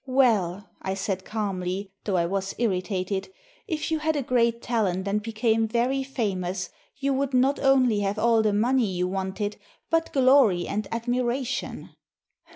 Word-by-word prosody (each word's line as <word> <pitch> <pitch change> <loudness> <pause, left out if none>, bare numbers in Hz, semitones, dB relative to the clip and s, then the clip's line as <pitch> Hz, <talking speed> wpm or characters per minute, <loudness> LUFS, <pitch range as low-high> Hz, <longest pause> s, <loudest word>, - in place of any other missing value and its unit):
"Well," 215 -8 +2
I 190 0 -2
said 190 -1 -3
calmly, 195 -2 -3
though 195 -3 +1
I 170 - +2
was 195 +2 -2
irritated, 190 -3 -1 0.4
''if 315 0 -2
you 320 - +1
had 315 0 0
a 285 - 0
great 235 -2 +2
talent 200 -6 -1
and 205 +1 0
became 225 0 +1
very 245 +4 +1
famous, 190 -8 -3 0.2
you 275 0 0
would 270 0 0
not 265 +3 +3
only 260 -5 +4
have 200 +1 -1
all 230 0 +4
the 215 -1 +2
money 235 +3 +2
you 180 0 0
wanted, 195 +2 -3 0.3
but 330 0 +1
glory 255 -9 +4
and 210 0 -2
admiration." 245 +2 -2
220 Hz, 155 wpm, -26 LUFS, 195-255 Hz, 0.4 s, only